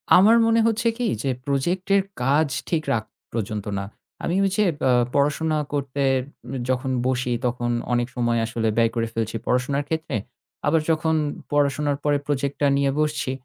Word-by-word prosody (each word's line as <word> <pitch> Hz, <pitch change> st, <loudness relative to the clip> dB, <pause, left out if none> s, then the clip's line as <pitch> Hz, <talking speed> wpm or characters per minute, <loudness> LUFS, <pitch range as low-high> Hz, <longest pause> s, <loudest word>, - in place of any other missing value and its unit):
আমার 210 Hz, +6 st, +7 dB
মনে 230 Hz, 0 st, +4 dB
হচ্ছে 225 Hz, +1 st, +1 dB
কি, 245 Hz, -, -1 dB, 0.2 s
যে 135 Hz, -, 0 dB, 0.2 s
প্রজেক্টের 180 Hz, +8 st, +1 dB, 0.2 s
কাজ 145 Hz, +4 st, +3 dB, 0.2 s
ঠিক 160 Hz, -3 st, 0 dB
রাত 110 Hz, -2 st, -1 dB, 0.3 s
পর্যন্ত 105 Hz, -2 st, -3 dB
না। 100 Hz, -, -4 dB, 0.4 s
আমি 170 Hz, -, 0 dB
ওই -, -, +2 dB
যে 210 Hz, -, +3 dB, 0.2 s
আ -, -, +5 dB, 0.2 s
পড়াশোনা 150 Hz, +2 st, +2 dB, 0.2 s
করতে 140 Hz, -1 st, -1 dB, 0.4 s
উম -, -, -7 dB, 0.2 s
যখন 130 Hz, +1 st, 0 dB, 0.2 s
বসি 130 Hz, -1 st, 0 dB
তখন 120 Hz, 0 st, -1 dB, 0.2 s
অনেক 120 Hz, 0 st, +1 dB
সময় 120 Hz, -1 st, +1 dB
আসলে 115 Hz, -1 st, -2 dB
ব্যয় 115 Hz, -1 st, +4 dB
করে 115 Hz, -1 st, 0 dB
ফেলছি 115 Hz, -1 st, -2 dB
পড়াশোনার 130 Hz, +3 st, +1 dB
ক্ষেত্রে। 160 Hz, -3 st, -2 dB, 0.5 s
আবার 160 Hz, +2 st, +3 dB
যখন 160 Hz, 0 st, +2 dB, 0.4 s
পড়াশোনার 145 Hz, 0 st, +1 dB
পরে 145 Hz, -1 st, +3 dB
প্রজেক্টটা 140 Hz, 0 st, 0 dB
নিয়ে 140 Hz, -1 st, +2 dB
বসছি, 150 Hz, -3 st, 0 dB
140 Hz, 160 wpm, -23 LUFS, 125-160 Hz, 0.5 s, আমার